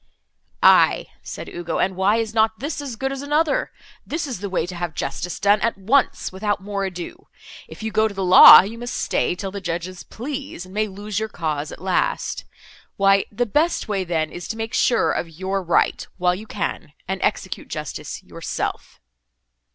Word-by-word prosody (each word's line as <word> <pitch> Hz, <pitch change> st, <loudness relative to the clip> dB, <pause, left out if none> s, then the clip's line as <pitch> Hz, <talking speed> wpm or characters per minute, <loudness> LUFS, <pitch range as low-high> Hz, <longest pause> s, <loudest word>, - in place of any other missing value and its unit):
"Aye," -, -, +5 dB
said -, -, -8 dB
Ugo, 170 Hz, -1 st, -4 dB
"and 190 Hz, 0 st, 0 dB
why 190 Hz, +3 st, +2 dB
is 225 Hz, -1 st, -1 dB
not 220 Hz, 0 st, +2 dB
this 290 Hz, +2 st, -4 dB
as 270 Hz, -5 st, -6 dB
good 270 Hz, +4 st, -2 dB
as 275 Hz, 0 st, -5 dB
another? 295 Hz, +1 st, +1 dB, 0.3 s
This 325 Hz, +2 st, -3 dB
is 255 Hz, -9 st, -5 dB
the 200 Hz, 0 st, -4 dB
way 185 Hz, -3 st, 0 dB
to 180 Hz, -, -7 dB
have 175 Hz, -3 st, -4 dB
justice 165 Hz, +5 st, -4 dB
done 205 Hz, +1 st, +3 dB
at 230 Hz, -1 st, 0 dB
once, 235 Hz, +8 st, +1 dB
without 205 Hz, +2 st, -1 dB
more 200 Hz, 0 st, -4 dB
ado. 190 Hz, -, -7 dB, 0.4 s
If -, -, -11 dB
you 220 Hz, -, -2 dB
go 220 Hz, +1 st, +3 dB
to 200 Hz, -2 st, -8 dB
law, 185 Hz, 0 st, +10 dB
you 225 Hz, +4 st, -7 dB
must 240 Hz, 0 st, -5 dB
stay -, -, 0 dB
till 190 Hz, +1 st, -5 dB
the 200 Hz, 0 st, -6 dB
judges 175 Hz, +1 st, -4 dB
please, 265 Hz, -, -6 dB
and 185 Hz, -, -14 dB
may 215 Hz, +1 st, 0 dB
lose 205 Hz, +1 st, -4 dB
your 220 Hz, 0 st, -3 dB
cause, 155 Hz, -5 st, -3 dB
at -, -, -10 dB
last. 190 Hz, -, -1 dB, 0.5 s
Why 195 Hz, 0 st, +4 dB
the 240 Hz, +4 st, 0 dB
best 300 Hz, -, 0 dB
way, 200 Hz, -3 st, -1 dB
then, 160 Hz, -3 st, -1 dB
is 175 Hz, -, -7 dB
to 225 Hz, -, -5 dB
make 225 Hz, 0 st, -4 dB
sure 235 Hz, -, +3 dB
of 170 Hz, -, -2 dB
your 190 Hz, +4 st, -3 dB
right, 175 Hz, -2 st, +1 dB
while 180 Hz, -1 st, +2 dB
you 210 Hz, +5 st, -7 dB
can, -, -, -4 dB
and -, -, -3 dB
execute -, -, -2 dB
justice -, -, -6 dB
yourself." -, -, -5 dB
200 Hz, 190 wpm, -22 LUFS, 180-230 Hz, 0.5 s, law